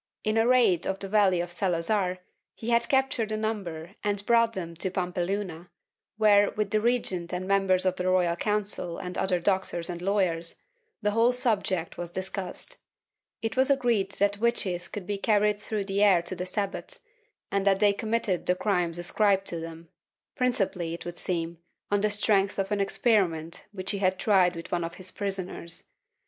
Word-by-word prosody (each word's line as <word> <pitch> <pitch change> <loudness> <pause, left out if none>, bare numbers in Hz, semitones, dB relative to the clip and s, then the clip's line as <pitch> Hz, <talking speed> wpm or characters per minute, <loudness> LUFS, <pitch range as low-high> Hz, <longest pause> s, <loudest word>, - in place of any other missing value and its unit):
In 215 0 0
a 225 +1 +3
raid 240 -9 +4
on 190 - -1
the 195 - -5
valley 195 -3 +3
of 175 0 -5
Salazar 180 +1 0 0.4
he 230 +1 -4
had 235 0 +2
captured 265 -5 +1
a 215 - -1
number 195 -6 -4
and 205 -1 -1
brought 230 0 +4
them 170 -4 -5
to 190 - -1
Pampeluna 180 -1 -3 0.5
where, 205 -2 +5
with 210 -1 -2
the 215 -1 +2
regent 200 -7 0
and 180 +1 -3
members 195 -2 +3
of 185 -1 +1
the 180 - -2
Royal 180 -2 +2
Council 205 -3 0
and 180 0 -6
other 185 -2 +1
doctors 180 -2 0
and 175 0 -6
lawyers, 180 -4 0 0.4
the 210 - +2
whole 230 +3 +4
subject 205 -8 0
was 175 -1 -4
discussed; 190 - -3 0.7
it 225 - -2
was 260 +1 +3
agreed 240 -8 +2
that 200 0 +1
witches 205 -7 0
could 205 -3 -7
be 200 +1 -3
carried 210 -1 +2
through 210 -2 -3
the 195 +1 -1
air 190 -5 +5
to 175 +2 -4
the 180 +1 -4
Sabbat, 200 +1 -3 0.5
and 200 0 +1
that 195 -1 +4
they 205 -1 +4
committed 215 -3 -1
the 180 - +4
crimes 180 -4 0
ascribed 195 +2 +2
to 170 - -1
them— 165 0 -9 0.5
principally, 195 -9 0
it - - -10
would 175 0 -6
seem, 170 -2 -2 0.3
on 205 -1 +2
the 210 - +2
strength 205 -1 +2
of 195 +1 -2
an 205 -1 +1
experiment 180 -7 +1
which 190 -2 -4
he 200 - -3
had 185 -1 +1
tried 185 -4 +3
with 165 - -8
one 175 -1 0
of 165 +1 -5
his 185 -1 -9
prisoners. 190 -4 -4
195 Hz, 185 wpm, -27 LUFS, 175-210 Hz, 0.7 s, where